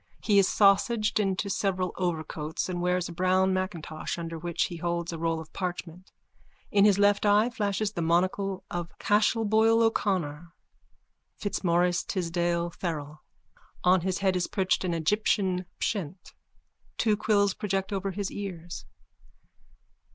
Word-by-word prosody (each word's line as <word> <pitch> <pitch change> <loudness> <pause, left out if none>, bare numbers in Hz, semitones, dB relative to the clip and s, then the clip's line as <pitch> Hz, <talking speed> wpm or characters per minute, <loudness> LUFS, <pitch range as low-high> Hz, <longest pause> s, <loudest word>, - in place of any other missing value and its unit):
He 205 -2 +4
is 195 - +4
sausaged 210 +2 +3
into 195 0 0
several 190 -2 -1
overcoats 160 -3 -3
and 180 -1 -3
wears 180 0 0
a - - -8
brown 185 +2 +2
macintosh 175 -5 -4
under 165 -1 -5
which 170 0 -1
he 175 - -4
holds 170 0 -2
a 165 - -6
roll 165 0 0
of 160 -1 -11
parchment. 180 -1 -5 0.6
In 200 0 +5
his 205 -2 +5
left 205 0 +3
eye 210 +3 +4
flashes 205 -1 -1
the 170 - -3
monocle 185 +3 0
of 175 -1 -5
Cashel 215 +2 +2
Boyle 225 +2 +4
O'Connor 175 -8 -1 0.8
Fitzmaurice 175 -3 +1
Tisdall 170 -2 -1
Farrell. 150 -4 -5 0.6
On 180 0 +4
his 185 +1 -1
head 190 -2 +1
is 180 -1 0
perched 190 -1 0
an 175 -2 -1
Egyptian 185 +1 +1
pshent. 185 -3 -3 0.6
Two 215 -2 +2
quills 205 -2 +2
project 195 0 -2
over 195 0 -2
his 195 0 -4
ears.) 175 -4 -6
185 Hz, 140 wpm, -28 LUFS, 170-200 Hz, 0.8 s, In